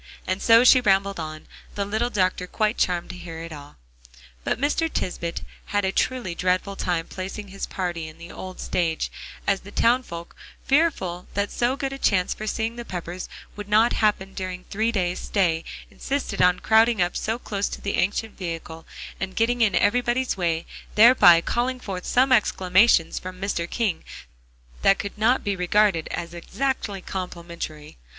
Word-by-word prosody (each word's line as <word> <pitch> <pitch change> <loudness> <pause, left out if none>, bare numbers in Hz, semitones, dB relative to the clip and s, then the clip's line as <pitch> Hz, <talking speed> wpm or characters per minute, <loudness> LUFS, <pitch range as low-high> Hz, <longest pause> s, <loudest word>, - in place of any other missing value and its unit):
And 185 +1 -2
so 230 +1 +7
she 255 0 +7
rambled 195 -3 +2
on, 155 -1 -6 0.3
the 200 - -1
little 220 +4 -1
doctor 185 -4 0
quite 215 +3 0
charmed 175 -1 0
to - - -9
hear 165 -2 -8
it 165 -1 -7
all. 145 -1 -11 0.7
But - - 0
Mr. 305 +4 +1
Tisbett 170 -2 -3 0.2
had 205 -1 0
a 190 - +1
truly 240 -3 -1
dreadful 185 +3 0
time 175 -3 -1
placing 195 +2 -6
his 195 +1 -5
party 175 -4 -3
in 155 0 -12
the 170 +1 -10
old 185 0 -8
stage, 170 -3 -1 0.3
as 195 -1 +2
the 200 - -12
townsfolk, 230 -8 0 0.3
fearful 265 - +1
that 200 0 0
so 245 +2 +1
good 270 -1 -3
a 275 - -7
chance 185 -7 +2
for 215 - -7
seeing 225 +2 -2
the 240 - -5
Peppers 180 -3 -6 0.3
would 205 0 -8
not 220 +3 +4
happen 200 -3 +1
during 185 -1 -5
the - - -28
three 220 +3 0
days' 180 -5 -1
stay, 170 -5 0 0.3
insisted 270 -7 -3
on 180 0 +4
crowding 225 0 +4
up 175 0 +2 0.3
close 200 -1 -2
to - - -6
the 200 - -2
ancient 205 +4 -1
vehicle, 165 -2 -6 0.3
and 190 -1 -4
getting 240 +2 +1
in 210 -5 +3
everybody's 245 +4 +2
way, 170 -3 -1 0.3
thereby 210 -7 +8
calling 250 +6 -1
forth 190 -6 -6
some 260 +2 +3
exclamations 190 -5 +4
from 185 0 -8
Mr. 180 -3 -2
King 210 -8 -1 0.8
that 195 - +5
could 200 - -5
not 225 +4 +2
be 200 -1 -1
regarded 185 -1 +2
as 170 -1 -5
exactly 205 +2 -3
complimentary. 170 - -6
195 Hz, 170 wpm, -24 LUFS, 175-225 Hz, 0.8 s, thereby